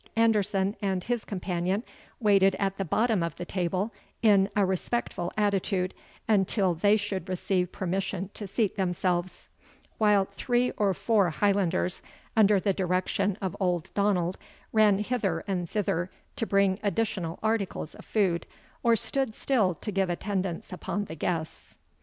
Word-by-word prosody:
Anderson 210 -3 +2
and 190 -3 0
his 240 -2 -1
companion 185 +1 -2 0.4
waited 195 -3 +4
at 195 -1 -1
the - - +1
bottom 215 +3 +1
of 170 -2 -2
the 175 - -6
table, 185 +4 -1 0.3
in 200 -3 +5
a 205 -2 +4
respectful 185 -1 -2
attitude, 195 -2 +1 0.3
until 195 -3 +2
they 205 +6 +3
should 200 -3 -4
receive 180 0 0
permission 190 0 -2
to 205 - -7
seat 210 +1 0
themselves; 180 -1 -1 0.5
while 210 -3 +4
three 245 +4 +1
or 200 -3 +1
four 200 -1 +2
Highlanders, 185 0 +1 0.3
under 210 -2 +5
the 195 +1 +1
direction 185 +1 0
of 190 0 -2
old 180 -4 -1
Donald, 190 -3 +1 0.3
ran 215 -3 +5
hither 205 -6 -1
and 180 -4 -2
thither 180 -4 -1 0.3
to 225 - -2
bring 195 -1 +3
additional 195 -4 -1
articles 220 -7 -1
of - - -12
food, 190 -6 0 0.3
or 235 -1 +4
stood 255 +1 0
still 215 -10 +1
to 210 - -5
give 195 -1 +1
attendance 185 0 -3
upon 205 +3 -3
the 160 - -8
guests. 160 0 -4
195 Hz, 145 wpm, -28 LUFS, 180-210 Hz, 0.5 s, in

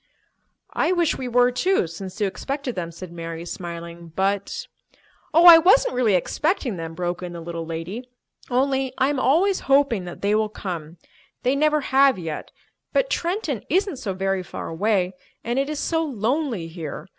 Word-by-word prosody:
"I - - +1
wish 345 -3 +2
we 255 - -3
were, 245 +1 +4
too, 305 - +2
since 185 +5 -8
you 210 - +2
expected 275 +6 -3
them," 170 -4 -4
said 170 +1 -9
Mary, 165 0 -6
smiling. 170 -1 -7
"But—" 200 +1 -1 0.7
"Oh, 330 +3 +5
I 335 -2 +12
wasn't 395 +9 +4
really 240 -6 +3
expecting 265 - 0
them," 165 -1 -6
broke 175 0 -3
in 180 -1 -6
the 170 - -6
little 165 -1 -6
lady. 180 +10 -5 0.4
"Only 265 +1 +1
I 265 +1 +3
am 290 -2 -1
always 355 +10 +3
hoping 270 -9 +3
that 175 - -9
they 205 +1 +2
will 215 0 +2
come. 170 -5 -6 0.5
They 255 +2 +2
never 305 +1 +2
have 270 -1 +4
yet, 160 -4 -5 0.4
but - - +1
Trenton 335 - -1
isn't 370 -1 +1
so 205 -7 -4
very 195 0 0
far 180 - -7
away, 185 +1 +1 0.3
and 240 +3 -1
it 275 +1 0
is 305 - -3
so 325 +2 0
lonely 250 - -1
here. 165 -3 -7
220 Hz, 175 wpm, -23 LUFS, 175-280 Hz, 0.7 s, I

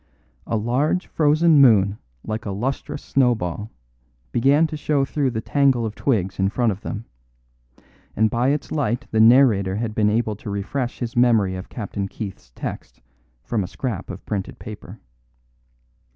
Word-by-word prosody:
'" - - -35
A 115 - 0
large 130 - 0
frozen 155 0 +4
moon 105 -5 +5 0.3
like 110 0 -4
a - - -2
lustrous 135 +7 -3
snowball 110 -6 0 0.6
began 140 - +4
to 155 - -4
show 145 -2 0
through 140 -1 0
the 110 -2 -3
tangle 135 -2 +2
of 110 - -3
twigs 100 -8 -1
in 95 0 +2
front 120 +1 +1
of 100 +1 -6
them, 110 0 -5 1.1
and 110 - +3
by 120 +3 +1
its 145 0 -2
light 135 -4 -1
the 110 - +1
narrator 110 -5 +5
had 110 0 -2
been 105 -1 +2
able 110 0 0
to 105 - -8
refresh 120 +6 -3
his 120 -2 -5
memory 115 -6 +3
of 90 +1 -8
Captain 100 -3 -4
Keith's 95 - -8
text - - -7 0.4
from 110 -4 -1
a - - -5
scrap 110 -2 -5
of 95 +1 -8
printed 100 -3 -4
paper. 105 -1 -10
115 Hz, 165 wpm, -22 LUFS, 100-135 Hz, 1.1 s, moon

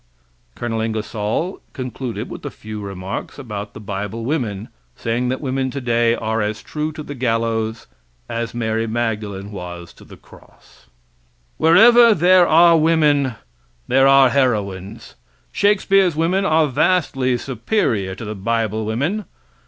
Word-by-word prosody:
[Col. 115 -2 -3
Ingersoll 110 - -3
concluded 125 -4 -5
with - - -9
a - - -4
few 110 0 -8
remarks 95 -1 -6
about 105 -6 -7
the - - -8
bible 105 +2 -5
women, 115 -8 -2 0.3
saying 120 +2 -2
that 130 - -3
women 135 -1 -1
today 120 -3 +1
are 110 0 -2
as 105 0 -3
true 155 0 -3
to 155 0 -7
the 145 - -7
gallows 115 -3 -1 0.4
as 115 0 -4
Mary 115 -1 -1
Magdalene 105 -3 -3
was 90 -3 -8
to - - -17
the - - -14
cross.] - - -20 0.7
Wherever 230 +8 +6
there 180 +1 +5
are 170 +1 +6
women 150 -5 +2 0.5
there 135 +1 +4
are 135 -2 +6
heroines. 105 -5 -1 0.4
Shakespeare's 195 -3 +2
women 180 +5 +1
are 160 -3 +3
vastly 135 -4 +1
superior 115 - -1
to 115 - -8
the 105 - -4
bible 110 +1 -1
women. 145 - -1
120 Hz, 135 wpm, -20 LUFS, 110-150 Hz, 0.7 s, Wherever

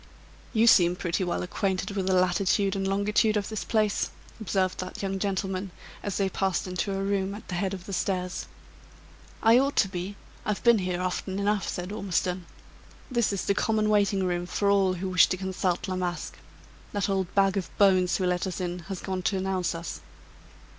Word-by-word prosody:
"You 225 -1 +3
seem 180 -6 +6
pretty 175 0 -1
well 175 -1 -1
acquainted 190 +2 -1
with 195 -2 -2
the 190 - +3
latitude 190 +2 +2
and 195 0 -1
longitude 210 +2 +2
of 205 - -2
this 215 -2 -3
place," 215 -2 +1 0.3
observed 190 -3 0
that 185 +2 -5
young 195 0 -2
gentleman, 195 -1 -2 0.3
as 200 -2 -3
they 195 - +2
passed 190 -2 -1
into 185 +2 -2
a 195 0 -1
room 195 0 0
at 210 - -11
the - - -4
head 190 +2 -1
of 185 -1 -10
the 200 - -6
stairs. 180 0 -2 1.0
"I 230 +2 +7
ought 275 +2 +1
to 195 - +4
be; 190 +1 -5 0.3
I've 210 -1 -2
been 235 -2 +6
here 180 -1 -2
often 185 +1 -2
enough," 205 0 0
said 180 +2 -4
Ormiston. 185 -3 -1 0.6
"This 235 -4 +2
is 200 - -2
the 200 - +3
common 215 +1 +1
waiting 200 -2 +3
room 175 -1 -1
for 200 +2 +1
all 195 -2 +3
who 185 +1 -3
wish 180 -2 +6
to 185 - -1
consult 185 0 -1
La 185 - -2
Masque. 180 -1 -3 0.6
That 205 -2 0
old 190 -3 -1
bag 195 -1 +4
of 195 -3 -2
bones 185 -3 +4
who 185 - -1
let 180 +1 0
us 185 - -4
in 180 -1 -3
has 190 -2 -4
gone 190 -1 -3
to 195 +2 0
announce 185 -2 -1
us." 165 0 -6
190 Hz, 195 wpm, -27 LUFS, 180-200 Hz, 1.0 s, I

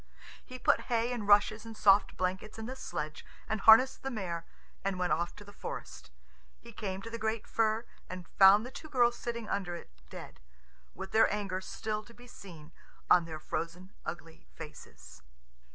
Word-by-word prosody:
He 255 - -9
put - - +3
hay 235 0 +1
and 220 -4 -4
rushes 210 +1 +5
and 225 -1 -9
soft 200 0 +4
blankets 185 +4 -2
in 220 - -5
the 255 +3 -5
sledge, 155 -11 -5 0.2
and 220 -2 -2
harnessed 225 +4 +7
the 270 - -3
mare, 180 -8 -4 0.4
and 195 -1 -1
went 180 -3 +1
off 170 +2 -1
to 205 - -11
the 205 0 -14
forest. - - -7 0.5
He - - -13
came 195 -2 -4
to 230 - -7
the 230 - -5
great 220 0 -1
fir, 225 +1 +1 0.2
and 180 -1 -7
found 200 +3 +7
the 255 - -7
two 295 +3 -9
girls 240 -3 +3
sitting 235 -2 -5
under 185 -3 -2
it 170 - -10 0.2
dead, - - -10 0.6
with 190 - -7
their 225 - +5
anger 195 -3 -2
still 215 +2 -4
to 235 - -16
be 245 - -14
seen 170 -9 -12 0.4
on 175 -2 +7
their 160 -1 -6
frozen, 170 +4 -5
ugly 165 -1 -8
faces. 60 - -11
205 Hz, 185 wpm, -31 LUFS, 175-225 Hz, 0.6 s, harnessed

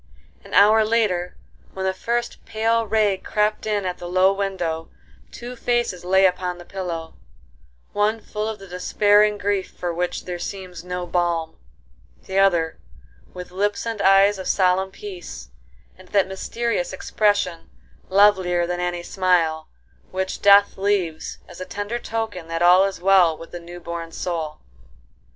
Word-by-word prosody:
An - - -7
hour 215 +2 +6
later 215 -6 0 0.4
when 190 0 -3
the 190 - +1
first 235 +5 -3
pale 225 +1 0
ray 210 -3 +2
crept 210 +2 -1
in 205 -2 0
at 180 -1 -3
the 175 - -7
low 185 +2 +4
window, 180 -5 -3 0.4
two 245 +1 -8
faces 240 -7 -1
lay 190 +2 +4
upon 180 -1 0
the 175 - -12
pillow; 170 -4 -5 0.8
one 210 +2 +1
full 215 0 -4
of 220 - -5
the 195 - -12
despairing 205 +3 +3
grief 200 -1 -1
for 175 -1 -3
which 175 +1 -3
there 180 -1 -5
seems 185 -2 -7
no 180 0 -4
balm; 170 -2 -1 0.7
the 190 +1 0
other 170 -5 +2 0.6
with 180 0 -8
lips 205 +4 -1
and 225 -3 -3
eyes 195 +1 +5
of 190 - -5
solemn 190 0 +2
peace, 380 - -9 0.5
and 185 - -17
that 200 -1 +2
mysterious 190 0 -2
expression, 190 -4 0 0.4
lovelier 185 -3 +4
than 175 +1 -3
any 175 -1 -2
smile, 175 -4 +1 0.4
which 190 0 -3
death 200 -1 +6
leaves 190 -5 -1
as - - -11
a - - -1
tender 205 +5 -4
token 220 -8 -4
that 165 +1 -2
all 180 +2 +7
is 195 -1 -4
well 180 -3 +4
with 165 - -11
the 175 - -6
new 175 +1 -10
born 170 -1 -6
soul. 160 -3 -4
190 Hz, 155 wpm, -22 LUFS, 175-205 Hz, 0.8 s, all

